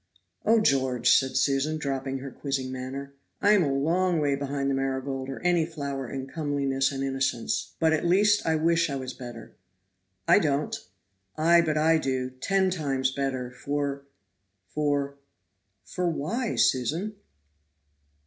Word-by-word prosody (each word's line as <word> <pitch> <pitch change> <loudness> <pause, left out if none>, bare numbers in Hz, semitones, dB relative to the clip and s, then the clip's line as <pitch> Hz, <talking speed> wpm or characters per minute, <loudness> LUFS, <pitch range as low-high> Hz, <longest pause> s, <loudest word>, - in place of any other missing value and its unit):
"Oh, 225 +1 +6
George," 130 - +2
said 130 -1 +3
Susan, 140 +3 +1
dropping 135 -2 -3
her 135 0 -7
quizzing 135 -2 -3
manner, 135 +2 -6 0.3
"I 205 - +4
am 210 -2 +5
a 140 - 0
long 170 +6 +1
way 145 -2 +1
behind 140 0 -2
the 140 - +1
marigold 135 0 -2
or 135 - -5
any 175 -2 +3
flower 140 -5 -5
in 135 -1 -4
comeliness 140 -2 -1
and 135 -1 -3
innocence, 135 -4 -1
but 160 -1 +3
at 155 - 0
least 205 +4 +4
I 160 - +1
wish 165 +1 +2
I 140 - -2
was 130 -1 -5
better." 120 -3 -10 0.7
"I - - +7
don't." 150 -4 0 0.6
"Ay, 170 +2 +5
but 155 -2 0
I 160 +1 +4
do, 130 -3 -2
ten 190 +9 +1
times 135 -6 0
better, 130 -2 -3
for 140 +2 -3 0.6
for 140 +1 -1 0.3
" 95 +2 -50
"For 180 -1 0
why, 205 - -2
Susan?" 160 - +1
140 Hz, 150 wpm, -27 LUFS, 135-160 Hz, 0.7 s, I